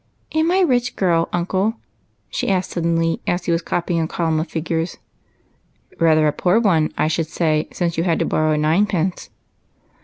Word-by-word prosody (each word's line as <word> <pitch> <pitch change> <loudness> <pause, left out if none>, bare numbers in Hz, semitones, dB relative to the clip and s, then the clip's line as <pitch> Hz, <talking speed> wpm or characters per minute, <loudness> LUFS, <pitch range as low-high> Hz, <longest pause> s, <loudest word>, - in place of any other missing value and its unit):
" - - -42
Am 315 +1 +2
I 360 - +2
a 380 -1 +4
rich 250 -4 0
girl^ 170 -3 +1
uncle? 190 +5 0 0.3
" 105 +1 -44
she - - -2
asked 185 -1 0
suddenly, 165 -1 0
as 175 0 -1
he - - 0
was 165 0 +1
copying 170 0 -1
a 160 - -1
column 160 -2 -1
of 160 - -2
figures. 165 +1 -3 0.5
" - - -32
Rather 155 -2 +4
a 150 - +3
poor 180 +7 +2
one, 170 -9 +2
I - - +2
should 160 0 -1
say, 155 -1 0
since 170 -2 -2
you - - +1
had 170 -2 +1
to - - 0
borrow 155 0 +1
a - - 0
ninepence." 175 +3 0
170 Hz, 205 wpm, -20 LUFS, 160-185 Hz, 0.5 s, a